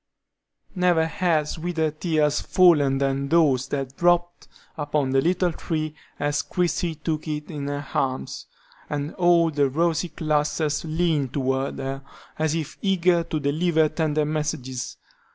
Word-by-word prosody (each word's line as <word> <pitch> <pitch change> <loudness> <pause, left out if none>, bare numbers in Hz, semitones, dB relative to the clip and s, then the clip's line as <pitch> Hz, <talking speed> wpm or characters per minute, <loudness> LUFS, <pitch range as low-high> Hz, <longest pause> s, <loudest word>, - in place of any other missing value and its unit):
Never 180 -4 +3
had 160 -2 +1
sweeter 160 -1 -1
tears 155 -2 +1
fallen 150 -7 +4
than 140 0 -1
those 140 -5 +3
that 135 -1 -4
dropped 175 0 +1 0.3
upon 145 -3 -1
the 135 0 +3
little 180 +2 +1
tree 155 -2 -3 0.3
as 145 0 0
Christie 175 -1 -1
took 155 0 -3
it 150 +2 -4
in 145 -3 -4
her 145 0 -3
arms, 130 -1 -2 0.4
and 145 +1 -3
all 175 -2 +4
the 145 -2 +2
rosy 165 +4 0
clusters 150 -1 0
leaned 160 -4 0
toward 135 0 -1
her 135 0 -4 0.4
as 155 0 +1
if 160 -2 -5
eager 180 -3 +2
to 160 -2 -2
deliver 155 +2 +2
tender 155 -2 0
messages. 150 -4 -3
155 Hz, 135 wpm, -24 LUFS, 145-170 Hz, 0.4 s, fallen